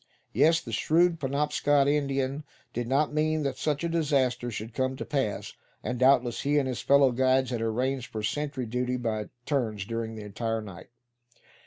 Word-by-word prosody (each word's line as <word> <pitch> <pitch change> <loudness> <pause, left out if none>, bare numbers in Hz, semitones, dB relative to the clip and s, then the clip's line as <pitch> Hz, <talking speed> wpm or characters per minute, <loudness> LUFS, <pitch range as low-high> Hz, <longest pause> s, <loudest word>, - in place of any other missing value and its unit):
Yes, 165 +1 +4
the 115 - -8
shrewd 165 - +2
Penobscot 145 0 +1
Indian 140 -1 0 0.3
did 120 0 -3
not 145 +4 +1
mean 155 0 +1
that 135 -2 -2
such 150 0 -1
a - - +1
disaster 140 -7 +1
should 110 0 -6
come 130 +1 -1
to 130 - -6
pass; 135 -8 -2 0.3
and 125 -1 -3
doubtless 130 -2 +3
he 145 +1 +1
and 140 -2 +2
his 125 -2 -3
fellow 140 -2 +5
guides 130 +1 +2
had 120 -2 -2
arranged 125 +3 -1
for 110 -1 -4
sentry 140 +2 -2
duty 125 +2 -1
by 110 -3 -3 0.2
turns 110 -9 -1
during 115 0 -4
the 110 - -7
entire 115 +2 -2
night. 95 -4 -10
130 Hz, 175 wpm, -28 LUFS, 115-145 Hz, 0.3 s, fellow